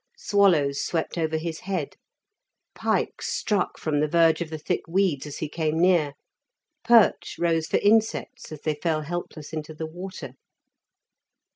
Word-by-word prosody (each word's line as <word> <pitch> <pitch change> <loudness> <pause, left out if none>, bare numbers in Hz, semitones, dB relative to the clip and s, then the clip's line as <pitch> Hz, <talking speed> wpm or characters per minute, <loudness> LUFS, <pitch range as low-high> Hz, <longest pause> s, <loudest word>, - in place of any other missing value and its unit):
Swallows 175 - +3
swept 165 -2 -2
over 160 -2 0
his 160 0 -4
head. 185 -7 -3 0.8
Pike - - -1
"struck" 205 -4 -1
from 150 -2 -1
the 155 - +2
verge 165 +1 +3
of 170 - -3
the 160 - -5
thick 175 +4 -2
weeds 170 -5 +1
as 145 - -7
he 155 - -3
came 160 +1 -1
near. 170 -5 +3 0.7
Perch 230 -2 +4
rose 165 -2 +1
for - - +2
insects 225 +2 +1
as 155 -2 -8
they 155 - 0
fell 155 +1 -1
helpless 160 -1 -6
into 155 0 -5
the 160 - -4
water. 175 -4 -8
165 Hz, 150 wpm, -25 LUFS, 155-180 Hz, 0.8 s, Perch